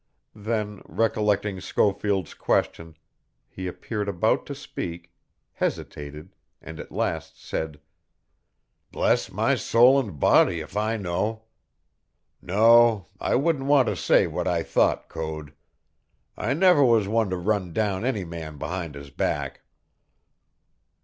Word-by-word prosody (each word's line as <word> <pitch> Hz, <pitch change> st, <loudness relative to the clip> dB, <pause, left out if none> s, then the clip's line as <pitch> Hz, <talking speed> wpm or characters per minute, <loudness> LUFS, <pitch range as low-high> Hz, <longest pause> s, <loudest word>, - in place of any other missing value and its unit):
Then, 105 Hz, -1 st, -3 dB
recollecting 105 Hz, -3 st, 0 dB
Schofield's 100 Hz, -2 st, 0 dB
question, 80 Hz, -1 st, -1 dB, 0.5 s
he 95 Hz, 0 st, -7 dB
appeared 105 Hz, +3 st, -4 dB
about 90 Hz, -4 st, +1 dB
to -, -, -5 dB
speak, 85 Hz, 0 st, -7 dB, 0.4 s
hesitated, 75 Hz, +5 st, -5 dB, 0.3 s
and 80 Hz, +1 st, -10 dB
at -, -, -9 dB
last -, -, -3 dB
said: 80 Hz, -2 st, -5 dB, 1.1 s
"Bless -, -, +1 dB
my -, -, +1 dB
soul 125 Hz, +4 st, +5 dB
and 100 Hz, -, -5 dB
body 85 Hz, -, +4 dB
if 80 Hz, +4 st, -9 dB
I 110 Hz, +2 st, 0 dB
know! 105 Hz, +4 st, -2 dB, 1.0 s
No, 110 Hz, +1 st, +4 dB
I -, -, 0 dB
wouldn't 140 Hz, 0 st, +1 dB
want 140 Hz, -3 st, +4 dB
to -, -, -2 dB
say -, -, +3 dB
what -, -, -3 dB
I -, -, +1 dB
thought, -, -, +1 dB
Code. 80 Hz, -2 st, -6 dB, 0.8 s
I 125 Hz, +6 st, -1 dB
never 180 Hz, -3 st, +5 dB
was 115 Hz, -5 st, +4 dB
one 110 Hz, -1 st, +1 dB
to 90 Hz, -, -2 dB
run 95 Hz, -1 st, -1 dB
down 100 Hz, +1 st, -1 dB
any 115 Hz, -7 st, -1 dB
man 80 Hz, -3 st, -7 dB
behind 85 Hz, -1 st, -5 dB
his 70 Hz, 0 st, -10 dB
back!" 70 Hz, 0 st, -2 dB
100 Hz, 125 wpm, -25 LUFS, 85-115 Hz, 1.1 s, soul